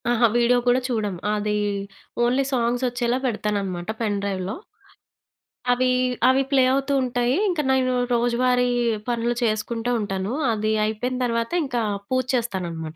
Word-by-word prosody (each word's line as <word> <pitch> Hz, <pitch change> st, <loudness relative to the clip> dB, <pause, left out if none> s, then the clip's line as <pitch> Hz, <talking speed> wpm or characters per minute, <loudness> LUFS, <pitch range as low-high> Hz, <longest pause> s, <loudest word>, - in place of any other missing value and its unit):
అహ! 240 Hz, -1 st, +1 dB
వీడియో 240 Hz, +1 st, +4 dB
కూడా 245 Hz, +1 st, +4 dB
చూడము. 210 Hz, -7 st, -2 dB
అది 210 Hz, 0 st, -1 dB, 0.7 s
ఓన్లీ 250 Hz, +3 st, +2 dB
సాంగ్స్ 245 Hz, 0 st, 0 dB
ఒచ్చేలా 240 Hz, 0 st, 0 dB
పెడతాననమాట 205 Hz, -6 st, -2 dB
పెన్ 210 Hz, -3 st, 0 dB
డ్రైవ్‌లో. 195 Hz, -1 st, -3 dB, 1.2 s
అవి 255 Hz, +1 st, +2 dB, 0.4 s
అవి 265 Hz, +1 st, +3 dB
ప్లే 270 Hz, -2 st, +5 dB
అవుతూ 275 Hz, +1 st, 0 dB
ఉంటాయి. 245 Hz, 0 st, 0 dB
ఇంకా 330 Hz, -5 st, 0 dB
నేను 260 Hz, -1 st, +2 dB, 0.2 s
రోజువారీ 245 Hz, +1 st, +2 dB, 0.4 s
పనులు 240 Hz, 0 st, 0 dB
చేసుకుంటా 225 Hz, +2 st, -1 dB
ఉంటాను. 195 Hz, -1 st, -3 dB, 0.2 s
అది 215 Hz, 0 st, 0 dB
అయిపోయిన 245 Hz, +4 st, -2 dB
తరువాత 230 Hz, -1 st, -1 dB
ఇంకా 245 Hz, -3 st, -1 dB, 0.3 s
పూజ 255 Hz, 0 st, +1 dB
చేస్తాననమాట. 175 Hz, -9 st, -3 dB
235 Hz, 130 wpm, -23 LUFS, 210-250 Hz, 1.2 s, ప్లే